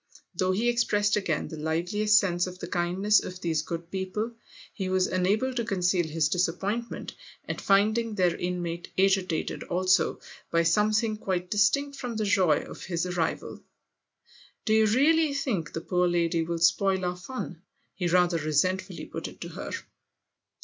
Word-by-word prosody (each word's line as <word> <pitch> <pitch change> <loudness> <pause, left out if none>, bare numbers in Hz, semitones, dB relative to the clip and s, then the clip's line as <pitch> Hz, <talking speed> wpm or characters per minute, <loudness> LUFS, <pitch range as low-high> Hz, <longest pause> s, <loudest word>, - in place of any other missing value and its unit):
Though 185 +1 +1
he 215 +6 0
ex 240 0 +3
pressed 205 -1 +1
again 175 -7 -1
the 160 - -7
liveliest 180 +7 +2
sense 180 -3 +2
of 180 0 -8
the - - -7
kindness 185 +4 +2
of 180 0 -7
these 165 -4 0
good 170 +1 -6
people, 195 +4 -3 0.4
he 190 -3 -3
was 185 0 +2
unable 200 +8 +1
to 240 -1 -1
conceal 180 -5 +1
his 160 -1 +1
disappointment 190 +7 -2 0.3
at - - -4
finding 215 +3 +2
their 180 -3 +2
inmate 175 -1 -3
agitated 190 -3 +1
also 185 -1 +2 0.3
by 170 0 +2
something 210 +5 +2
quite 180 -4 -3
distinct 280 +8 +2
from 245 -3 -4
the 215 -1 -1
joy 185 -6 +3
of - - -9
his 175 -1 -1
arrival. 175 -3 -2 1.0
"Do 220 - +2
you 220 0 +5
really 290 +6 +3
think 215 - -2
the 165 - -4
poor 180 +1 +1
lady 170 -1 +1
will 170 +1 -2
spoil 185 +3 +2
our 180 0 -1
fun? 180 -3 -7 0.2
" - - -44
he 180 - -2
rather 175 -1 +3
resentfully 155 +5 0
put - - -6
it - - -12
to - - -5
her. - - -7
185 Hz, 165 wpm, -27 LUFS, 175-210 Hz, 1.0 s, you